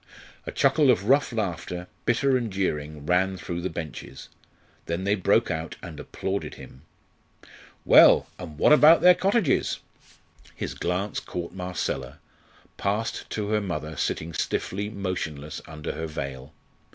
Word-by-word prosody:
A - - -3
chuckle 140 +1 +3
of 110 -7 +4
rough 140 +1 +4
laughter, 90 -5 -3 0.2
bitter 130 +3 +3
and 120 -4 -1
jeering, 75 -6 -3
ran 95 +3 +2
through 85 -1 -5
the 95 - -2
benches. 80 -5 -8 0.6
Then 85 +3 -2
they 100 +1 +2
broke 95 -3 +2
out 80 0 -4
and - - -8
applauded 95 +1 -4
him. 65 - -13 1.0
Well, - - +7
and 80 -4 -9
about 150 +2 +7
their 180 +1 +8
cottages? 195 - +1 0.8
His - - -4
glance 90 +4 -2
caught 85 -1 -6
Marcella, 90 -2 -4 0.6
passed 105 +3 -2
to 105 -1 -3
her 105 0 +1
mother 80 -5 -4
sitting 80 +4 -2
stiffly 100 +6 -2
motionless 85 -8 -4
under 75 -1 -5
her 80 - -4
veil. 70 -2 -6
90 Hz, 135 wpm, -26 LUFS, 80-110 Hz, 1.0 s, their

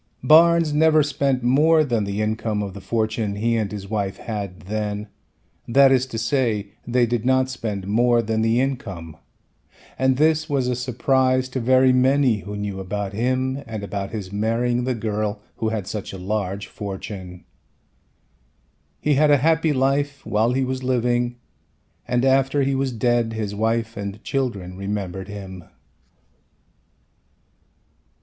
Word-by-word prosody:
Barnes 165 +2 +5
never 155 0 +4
spent 140 -3 0
more 155 +6 +4
than 120 -7 0
the 100 +2 -2
income 110 -1 -1
of 100 -2 -5
the 100 - -9
fortune 110 -1 -1
he 115 +3 0
and 110 -3 -1
his 100 -2 -6
wife 100 -2 -2
had 100 -5 -5
then, 105 +1 -4 0.6
that 135 +3 +5
is 130 0 +3
to 115 - -6
say 115 -4 0 0.2
they 120 0 +3
did 120 -1 -1
not 130 +1 +2
spend 105 -6 -4
more 120 +3 +3
than 110 0 -1
the 115 +2 +2
income 110 - -3 0.8
and 130 0 +2
this 155 +1 +2
was 135 -3 0
a 125 - +1
surprise 130 +1 +1
to 130 - -3
very 130 +1 +4
many 130 -2 +3
who 105 +1 -7
knew 100 -1 -4
about 100 +1 -4
him 130 +4 -1
and 110 -2 -5
about 100 -1 -4
his 100 -4 -6
marrying 120 +3 0
the 130 -1 0
girl 105 -1 -2 0.2
who 110 - -1
had 110 -4 -3
such 105 +1 -5
a - - -6
large 100 0 -3
fortune. 95 -2 -7 1.6
He 150 - +1
had 150 +2 +4
a 145 - +6
happy 160 +3 +2
life 140 +1 0
while 110 +3 +1
he 130 0 +1
was 130 0 -3
living 120 -1 0 0.7
and 125 +1 +1
after 135 +1 +3
he 135 +1 +1
was 135 0 0
dead 120 0 +1
his 105 -2 -3
wife 115 +2 -1
and 100 0 -6
children 100 -10 -3
remembered 95 -2 -4
him. 95 -4 -8
115 Hz, 155 wpm, -22 LUFS, 105-130 Hz, 1.6 s, a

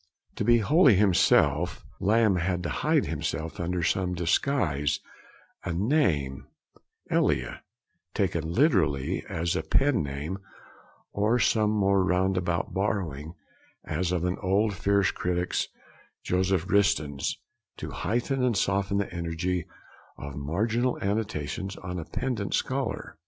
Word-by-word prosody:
To - - -1
be 120 +2 +5
wholly 135 - +5
himself, 90 -4 +3
Lamb 105 0 +3
had 90 +1 -1
to 85 - -2
hide - - +1
himself 80 +5 -4
under 90 0 -1
some 90 +2 0
disguise, 85 - +1 0.6
a 85 - -3
name, 85 - 0 0.6
'Elia,' - - +1 0.5
taken 85 -4 -1
literally 85 - +2
as 85 +1 -1
a - - 0
pen 130 - +2
name, 70 +7 -4 0.7
or 105 +4 +2
some 110 -3 +2
more 100 -2 +2
roundabout 90 -1 0
borrowing, 85 -6 -2 0.5
as 90 -1 -1
of 90 -1 0
an 90 +1 -1
old 100 +2 +2
fierce 100 +1 +2
critic's, 90 0 -1 0.6
Joseph 95 -1 0
Ritson's, 100 -9 +1 0.4
to - - -6
heighten 120 +4 -1
and 120 -5 +2
soften 100 0 +1
the 100 -3 -2
energy 85 +1 -2 0.5
of 70 -1 -7
marginal 110 - 0
annotations 100 -2 -2
on 90 0 -6
a 80 - -6
pedant 110 -3 -2
scholar. - - -3
95 Hz, 120 wpm, -27 LUFS, 85-105 Hz, 0.7 s, be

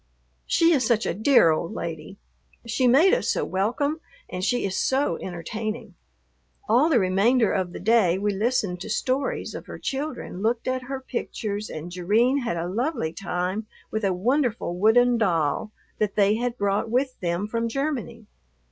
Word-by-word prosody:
She 335 -1 +4
is 270 -5 +2
such 225 -1 +2
a - - 0
dear 220 - +5
old 160 +2 -2
lady! 165 +3 -6 0.5
She 235 +3 +1
made 300 +10 +5
us - - +1
so - - 0
welcome 250 - -1 0.3
and 180 - -5
she 245 +4 +1
is 190 -1 -2
so 270 +2 +1
entertaining. 215 +5 -5 0.7
All 255 +9 +4
the 295 - +4
remainder 210 +4 +3
of 185 -3 -1
the - - -7
day 200 -4 +3
we 205 +1 0
listened 205 -4 0
to 215 - -6
stories 260 +5 -1
of - - -8
her - - -7
children, 275 -9 -4
looked 230 +2 0
at 255 0 0
her 265 +1 -5
pictures, 215 -5 -4
and 160 +3 -7
Jerrine 215 +10 +2
had 230 -10 -2
a 170 +1 -2
lovely 225 - -2
time 185 +3 -3 0.2
with 220 0 -2
a 195 - +2
wonderful 235 - 0
wooden 235 +5 +4
doll 170 -1 0 0.3
that 210 -2 0
they 205 0 +4
had 240 +2 -2
brought 200 +2 0
with 255 +2 0
them 175 +2 -1
from 230 +1 -1
Germany. 255 -4 -3
220 Hz, 170 wpm, -25 LUFS, 185-250 Hz, 0.7 s, dear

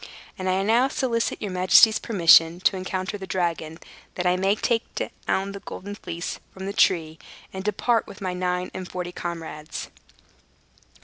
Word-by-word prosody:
And 185 - -5 0.2
now 230 +4 +4
I - - +1
solicit 240 -4 -1
your 205 - -3
majesty's 185 +4 +6
permission 170 -5 +5
to 190 - +3
encounter 185 +2 -3
the 190 - -7
dragon, 165 -3 -2 0.4
that 180 - -3
I 180 0 +3
may 195 +2 +2
take 230 +1 -1 0.2
down 195 +1 0
the 200 - -7
Golden 200 +1 -8
Fleece 170 -4 -6
from 190 0 -8
the 200 - -3
tree, 160 -5 +2 0.3
and 190 0 -5
depart, 225 +3 +1
with - - -11
my 185 -2 -3
nine 180 0 -2
and 185 -1 -6
forty 180 -1 -5
comrades." 165 -3 -6
185 Hz, 165 wpm, -24 LUFS, 175-200 Hz, 0.4 s, majesty's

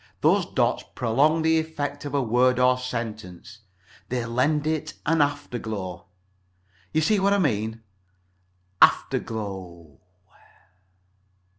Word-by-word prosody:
Those - - +3
dots - - 0
prolong 145 +7 +2
the 160 0 +3
effect 160 -3 -4
of 145 0 -4
a 140 - +2
word 125 +2 +3
or 125 0 +4
sentence; 115 -3 -6 0.5
they 125 -2 -2
lend 140 +6 +1
it 155 0 -2
an 165 +1 +3
afterglow. 110 -11 -3 0.8
You 155 - +1
see 205 +6 +2
what 200 +1 +3
I - - +3
mean? 110 - -1 1.0
Afterglow 95 -8 0
125 Hz, 110 wpm, -25 LUFS, 110-150 Hz, 1.0 s, or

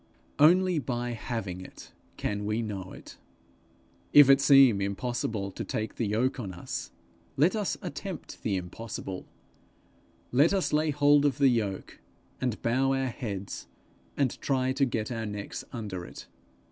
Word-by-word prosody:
Only 180 +3 +5
by 120 -2 -3
having 110 -6 -4
it 95 - -12 0.3
can 105 0 -2
we 105 +3 -1
know 95 -4 -5
it. - - -12 0.9
If 145 -2 +9
it 135 0 +5
seem 135 -7 +6
impossible 100 0 -2
to - - -5
take 110 0 -4
the 115 - 0
yoke 125 +6 0
on 100 -6 -5
us, 85 - -5 0.5
let 160 +10 +4
us 210 -3 -1
attempt 180 +2 -7
the 100 - 0
impossible; 95 +1 -6 1.0
let 145 +9 +4
us 190 - 0
lay 155 +1 +2
hold 145 0 +4
of 145 -2 +2
the 140 -2 +5
yoke, 105 -6 -2 0.4
and 125 -4 -1
bow 130 +3 +2
our 135 -1 0
heads, 100 -6 -6 0.5
and 135 -4 0
try 130 -1 +1
to 135 +1 +2
get 115 -2 -2
our 115 -2 -3
necks 105 -1 -6
under 100 -7 -5
it. - - -10
120 Hz, 150 wpm, -28 LUFS, 105-140 Hz, 1.0 s, If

